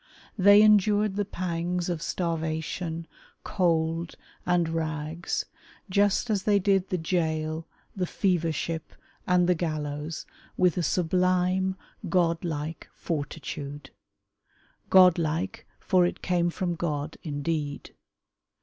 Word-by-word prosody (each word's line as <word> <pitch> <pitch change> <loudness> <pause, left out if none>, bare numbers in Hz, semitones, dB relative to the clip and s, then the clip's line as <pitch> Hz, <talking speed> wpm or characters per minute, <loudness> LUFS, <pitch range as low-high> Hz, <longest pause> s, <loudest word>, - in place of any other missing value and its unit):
They 200 +1 +7
endured 210 -1 +4
the 205 0 0
pangs 175 -1 -2
of 170 -3 -2
starvation, 165 0 -2 0.4
cold 165 -2 0 0.3
and 175 -2 +3
rags 160 0 -2 0.5
just 205 +4 +2
as 200 -3 +1
they 205 +1 +3
did 195 -1 +2
the 185 - 0
gaol, 160 -1 -1 0.3
the 185 -2 -1
fever 175 -4 +1
ship, 160 +1 -4 0.3
and 180 -1 +4
the 180 - +5
gallows, 155 -2 -3 0.3
with 180 -3 +3
a 180 - 0
sublime, 185 +2 +1 0.3
godlike 165 -3 -1
fortitude. 145 -2 -5 1.0
Godlike, 180 -1 +3
for 180 -2 +3
it - - -6
came 175 -1 +1
from 175 0 -2
God 155 -3 -3
indeed. 145 -1 -3
170 Hz, 105 wpm, -27 LUFS, 160-185 Hz, 1.0 s, They